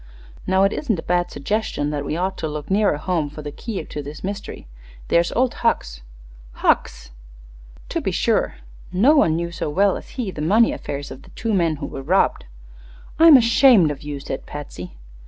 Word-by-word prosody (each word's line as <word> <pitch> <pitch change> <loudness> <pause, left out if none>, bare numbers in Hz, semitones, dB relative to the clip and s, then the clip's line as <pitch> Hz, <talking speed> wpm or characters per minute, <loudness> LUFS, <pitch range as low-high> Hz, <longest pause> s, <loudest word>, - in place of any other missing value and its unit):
Now, 190 +1 +3
it 195 - +2
isn't 235 -10 -1
a 165 - -6
bad 175 0 0
suggestion 150 -1 -2
that 145 -1 -3
we 150 +3 -3
ought 190 +2 -1
to 160 - -2
look 150 +2 -6
nearer 200 -6 +2
home 160 -2 -1
for 150 +1 -9
the 145 - -6
key 195 0 -6
to 150 - -6
this 145 +2 -9
mystery. 200 - -6 0.4
There's 170 0 +3
old 255 +1 +1
Hucks." - - 0 0.5
"Hucks!" - - 0 0.8
"To - - -2
be - - -1
sure. - - 0 0.4
No 240 +12 +4
one 165 - +4
knew 170 +1 -3
so 165 - -4
well 195 +5 +2
as - - -12
he 230 -7 -2
the 150 - -7
money 215 +9 +4
affairs 140 0 -6
of 135 - -9
the - - -17
two 225 -2 -3
men 170 -5 +2
who - - -6
were 135 - -7
robbed." 180 +8 +1 0.7
"I'm 325 -3 +9
ashamed 235 - +5
of 145 - -7
you," 145 -1 -6
said 135 0 -6
Patsy. 90 - -8
170 Hz, 195 wpm, -21 LUFS, 145-205 Hz, 0.8 s, I'm